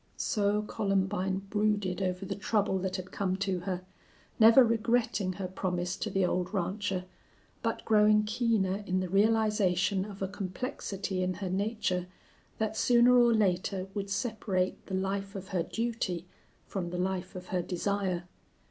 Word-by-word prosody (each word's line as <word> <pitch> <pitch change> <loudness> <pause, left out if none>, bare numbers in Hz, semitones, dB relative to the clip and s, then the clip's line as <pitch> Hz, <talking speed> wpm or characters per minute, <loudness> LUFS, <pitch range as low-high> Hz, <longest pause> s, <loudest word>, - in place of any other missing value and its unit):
So 210 0 +1
Columbine 195 -2 0
brooded 205 -3 +1
over 185 0 -1
the - - -3
trouble 205 -2 0
that 185 0 -2
had 185 0 -6
come 190 -2 -1
to 190 -1 -1
her, 180 0 -3 0.6
never 230 +4 +9
regretting 230 -4 +1
her 185 0 -4
promise 180 -1 -2
to - - -3
the 195 -1 +1
old 180 +2 -1
rancher, 190 0 -1 0.6
but - - -2
growing 210 -1 +5
keener 210 -3 0
in 185 0 +1
the 185 -1 -2
realization 200 -2 +2
of 200 -2 -6
a - - 0
complexity 195 -1 -4
in 185 0 0
her 185 0 -4
nature 190 -2 -1 0.5
that 220 0 -1
sooner 240 +2 +5
or 240 -1 +6
later 190 -2 +1
would 200 -1 -3
separate 200 -4 -1
the 190 - -2
life 195 +1 -2
of 190 -1 -7
her 180 -3 0
duty 205 -3 -2 0.4
from 180 -3 -4
the 180 - -4
life 185 0 -2
of 180 0 -8
her 180 -2 0
desire. 185 0 -1
195 Hz, 155 wpm, -30 LUFS, 185-210 Hz, 0.6 s, never